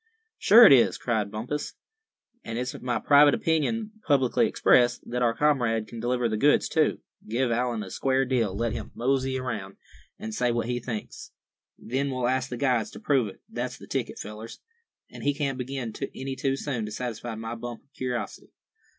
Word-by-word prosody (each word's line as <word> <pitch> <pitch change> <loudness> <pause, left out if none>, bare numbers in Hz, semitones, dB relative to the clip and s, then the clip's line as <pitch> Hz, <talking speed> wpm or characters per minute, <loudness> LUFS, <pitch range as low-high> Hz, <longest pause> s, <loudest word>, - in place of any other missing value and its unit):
"Sure 230 +4 +8
it 145 - +9
is," 125 - +4
cried 110 -4 -1
Bumpus; 120 +8 -4 0.7
"and 115 - -5
it's 125 +1 -3
my 125 -1 -1
private 145 0 +6
opinion, 210 +8 0 0.2
publicly 135 -4 +3
expressed, 120 -1 +3
that 125 +1 -2
our 115 -2 +2
comrade 120 -7 +1
can 115 - -9
deliver 120 0 0
the 110 -1 -1
goods 145 +6 +3
too. - - +1 0.3
Give 120 +2 0
Allan 120 -2 0
a 95 - -9
square 135 0 +1
deal. 115 -7 0
Let 115 +1 -1
him - - -6
'mosey' 130 +1 0
around, 105 -7 -5 0.4
and 110 - -6
say 120 +2 +1
what 120 -1 -1
he 120 +1 -2
thinks. 115 -3 -7 0.4
Then 135 +4 -2
we'll 130 -2 -1
ask 130 +1 0
the 125 - -5
guides 125 -4 +1
to - - -11
prove 135 -6 +2
it. 95 - -12
That's - - -4
the - - -12
ticket, - - -3
fellers. 105 +2 -8 0.5
An' - - -10
he 145 0 +1
can't 140 -3 -2
begin 125 -3 -4 0.2
any 135 0 -4
too 135 0 0
soon 125 -6 -3
to - - -7
satisfy 120 0 -5
my 115 +1 -5
bump 120 0 -7
of 140 - -41
curiosity. 125 -2 -4
125 Hz, 185 wpm, -26 LUFS, 115-135 Hz, 0.7 s, it